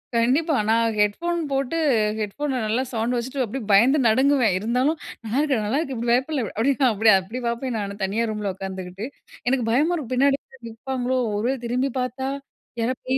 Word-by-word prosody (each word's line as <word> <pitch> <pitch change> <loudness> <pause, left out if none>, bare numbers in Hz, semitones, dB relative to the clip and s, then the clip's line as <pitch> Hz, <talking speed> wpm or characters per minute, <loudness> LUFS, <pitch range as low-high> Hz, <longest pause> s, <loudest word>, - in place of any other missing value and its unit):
கண்டிப்பா, 275 +7 +2
நான் 225 -1 +2
ஹெட்ஃபோன் 340 +13 +1
போட்டு 275 +4 -1 0.4
ஹெட்ஃபோன்ல 255 +6 -2
நல்லா 230 +5 0
சவுண்ட 235 +2 -1
வச்சுட்டு 260 +2 -2
அப்டியே 235 +2 -4
பயந்து 250 +9 +5
நடுங்குவேன். 255 -3 +3
இருந்தாலும் 250 +9 +1 0.3
நல்லாருக்கு 265 +1 +1
நல்லாருக்கு 270 +4 -1
இப்டி 235 +1 -2
பயப்டல 260 0 +1
அப்டி 275 +4 +3 0.2
அப்டி 215 +1 +4
அப்டி 230 +7 -7
பாப்பேன் 235 0 -2
நானு 200 0 -5
தனியா 215 +5 0
ரூம்ல 210 -3 -3
உட்காந்துகிட்டு, 190 +2 -6 0.4
எனக்கு 255 -3 +1
பயமா 300 +8 +3
இருக்கும் 255 -6 -4
பின்னாடி 275 +2 +3 0.3
நிப்பாங்களோ? 255 +2 -2 0.2
ஒருவேல 245 +5 -1
திரும்பி 255 +3 0
பாத்தா? 255 +2 -3 0.5
யாரோ 235 +3 +1
பேய் 260 +1 +1
245 Hz, 155 wpm, -23 LUFS, 220-270 Hz, 0.5 s, பயந்து